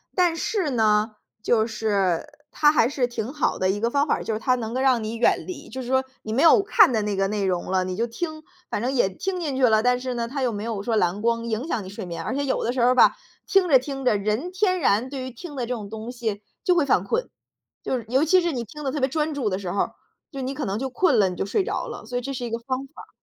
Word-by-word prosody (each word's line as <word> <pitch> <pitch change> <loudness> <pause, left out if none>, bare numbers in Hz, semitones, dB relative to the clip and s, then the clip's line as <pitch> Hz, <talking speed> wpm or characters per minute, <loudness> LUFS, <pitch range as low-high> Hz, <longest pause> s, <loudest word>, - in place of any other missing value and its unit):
但 355 -3 +3
是 365 -2 -1
呢， 215 -2 +2 0.3
就 220 -1 +2
是 205 -6 0 0.3
它 295 -1 +4
还 270 -6 +4
是 260 -2 0
挺 240 +2 -5
好 300 - 0
的 185 - +1
一 205 - -3
个 230 +2 +1
方 280 +3 +2
法 - - +2
儿， - - -6
就 - - -3
是 215 - -2
它 255 +3 +2
能够 245 +1 -2
让 255 -4 +3
你 220 +1 -4
远 230 - +2
离， 365 - -7
就 260 - -6
是 245 - -7
说 260 +1 +2 0.2
你 215 - -6
没 275 +7 +2
有 330 - +7
看 405 - +5
的 220 - +1
那 205 -1 -1
个 195 0 +1
内 210 -1 -1
容 180 0 -1
了， 185 -1 +2
你 185 0 -4
就 230 - 0
听， 310 +6 -5 0.3
反 - - -2
正 245 +4 -1
也 240 -8 +2
听 365 - -4
进 295 -5 -2
去 265 - 0
了， 220 -3 +5
但 250 +1 +2
是 255 0 -3
呢， 235 -1 -2
它 270 +2 -3
又 245 - +1
没 205 0 -5
有 220 -3 -3
说 230 0 0
蓝 180 -1 +1
光 230 +1 0
影 230 +7 -2
响 220 - -2
你 185 - -8
睡 200 +1 -7
眠。 170 -1 -5
而 260 - -3
且 285 0 -1
有 260 - 0
的 235 - 0
时 255 - -3
候 240 - +5
儿 - - +5
吧， - - +6 0.3
听 390 -3 +4
着， 270 -5 +6
听 270 0 -6
着， 215 -5 +4
人 215 - -2
天 370 -1 +1
然 240 -2 +2
对 270 -1 -5
于 260 - -6
听 290 +5 -9
的 250 -3 -2
这 250 - -2
种 210 -4 -6
东 220 +2 -6
西 220 -4 -4 0.2
就 360 - +3
会 330 -5 +3
犯 245 -9 +3
困。 475 - -1 0.5
就 260 - -1
是 230 - -7
尤 260 +5 +2
其 370 +4 +5
是 345 -1 0
你 245 -5 -3
听 300 +7 -10
得 270 - -1
特 295 - -3
别 265 0 +1
专 305 +2 -1
注 265 -7 -1
的 185 - -1
时 190 -3 -4
候 200 - -2
儿， - - -1 0.4
就 275 - -5
你 260 +1 -3
可 285 - -4
能 195 +1 -2
就 265 +3 -3
困 295 -1 +3
了， 200 -3 +5
你 180 - -4
就 - - -2
睡 205 - 0
着 - - -3
了， 460 - -8
所 245 +3 -7
以 - - -6
这 275 +3 -5
是 245 -1 -4
一 235 - -5
个 230 - -2
方 260 +2 -3
法。 - - -12
245 Hz, 325 characters per minute, -24 LUFS, 215-280 Hz, 0.5 s, 有